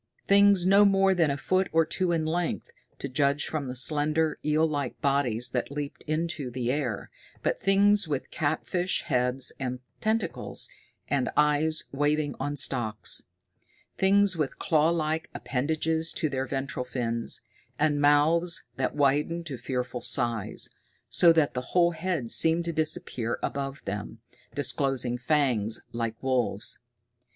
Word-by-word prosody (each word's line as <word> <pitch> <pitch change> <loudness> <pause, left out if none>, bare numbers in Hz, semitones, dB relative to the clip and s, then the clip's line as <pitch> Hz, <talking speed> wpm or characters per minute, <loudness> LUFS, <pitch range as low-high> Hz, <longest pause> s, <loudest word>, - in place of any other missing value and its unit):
Things 200 -2 +5
no 200 +2 +6
more 195 -1 +4
than 170 -4 +2
a 140 - -1
foot 185 +5 0
or 165 0 +3
two 180 +2 -1
in 165 -2 0
length, 170 +2 -2 0.3
to - - -5
judge 140 +2 +1
from 150 -4 -3
the 125 - -5
slender, 150 +4 +1
eel 155 +2 +2
like 145 -4 -3
bodies 130 -4 0
that 125 - -2
leaped 145 0 -6
into 155 -3 -2
the 125 0 -2
air, 130 -7 -3 0.3
but - - -1
things 200 0 +3
with 145 -4 -4
catfish 175 +4 -1
heads 125 +1 +2
and 125 -2 -3 0.2
tentacles, 215 -6 -1 0.4
and 140 -3 0
eyes 150 +1 +4
waving 145 +1 0
on 145 0 -3
stalks; 110 -5 +1 0.7
things 195 0 +3
with 150 -4 -2
clawlike 160 0 +1
appendages 160 +6 -1
to 155 - -1
their 135 -1 -3
ventral 135 -1 -3
fins, 115 -2 -3 0.4
and 150 -1 +1
mouths 155 +4 +3
that 130 +1 -1
widened 150 +4 +1
to 145 -5 -5
fearful 125 0 -4
size, 120 -5 -1 0.4
so 170 - +5
that 160 -3 +2
the 125 - -2 0.2
whole 175 -1 +5
head 165 -7 -2
seemed 165 +1 +4
to 170 - -3
disappear 150 -7 0
above 135 0 -4
them, 105 +3 -5 0.4
disclosing 135 -4 +1
fangs 125 -6 0
like 115 -1 -3
wolves'. 120 -5 -1
145 Hz, 140 wpm, -27 LUFS, 130-165 Hz, 0.7 s, no